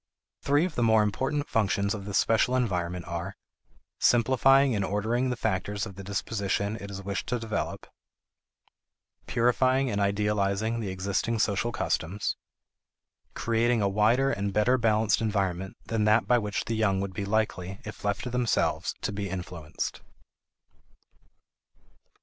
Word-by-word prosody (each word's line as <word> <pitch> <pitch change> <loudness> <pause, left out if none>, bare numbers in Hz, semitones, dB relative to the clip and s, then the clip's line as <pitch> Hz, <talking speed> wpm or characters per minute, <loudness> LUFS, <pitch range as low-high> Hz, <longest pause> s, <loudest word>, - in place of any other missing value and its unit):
Three 145 +4 +3
of 185 - -4
the 120 - -2
more 110 -2 +5
important 135 +8 -1
functions 100 -1 +1
of 100 -2 -6
this 100 -1 -1
special 115 +3 +3
environment 90 -7 -1
are: 85 +3 -4 0.6
simplifying 130 +3 +4
and 100 - 0
ordering 110 +6 0
the 125 - -1
factors 100 -1 -2
of 100 - -8
the 100 +1 -9
disposition 100 +1 -2
it 100 - -7
is 100 0 -7
wished 100 0 -3
to 125 - 0
develop; 110 -2 -4 1.4
purifying 130 +2 +2
and 100 -1 -1
idealizing 105 +2 0
the 105 -4 -3
existing 100 +5 -1
social 110 +2 +1
customs; 100 -4 -1 1.0
creating 115 -1 +1
a - - +3
wider 110 +7 +3
and 100 -3 -2
better 120 +5 +3
balanced 110 -2 +2
environment 95 -4 -1
than 110 -2 0
that 105 +2 +4
by 125 -1 +4
which 105 -2 -3
the 115 - -2
young 105 -3 +1
would 95 -1 -3
be 100 - -3
likely, 100 -2 -1
if 105 - -9
left 100 0 -1
to 125 - -4
themselves, 125 -1 0
to - - -2
be 100 -1 -4
influenced. 90 -4 -5
105 Hz, 145 wpm, -27 LUFS, 100-115 Hz, 1.4 s, more